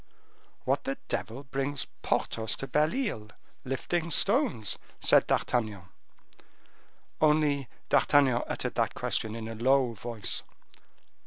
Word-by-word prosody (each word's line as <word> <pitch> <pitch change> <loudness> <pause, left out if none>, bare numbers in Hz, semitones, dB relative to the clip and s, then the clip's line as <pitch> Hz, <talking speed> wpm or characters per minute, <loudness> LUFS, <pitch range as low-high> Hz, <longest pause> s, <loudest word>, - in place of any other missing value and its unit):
"What 135 +2 0
the 135 - -2
devil 120 +5 -3
brings 135 +1 -3 0.2
Porthos 110 -1 0
to - - -5
Belle 150 +3 +2
Isle, 210 - -2 0.4
lifting 160 +6 -2
stones?" 200 - +2 0.2
said - - +5
D'Artagnan; 110 -6 0 1.4
only 150 -3 +3 0.2
D'Artagnan 135 -4 +4
uttered - - -3
that - - 0
question 110 0 -1
in 115 -1 -5
a 115 - -5
low 125 +2 +2
voice. 115 -1 -3
135 Hz, 110 wpm, -29 LUFS, 115-150 Hz, 1.4 s, said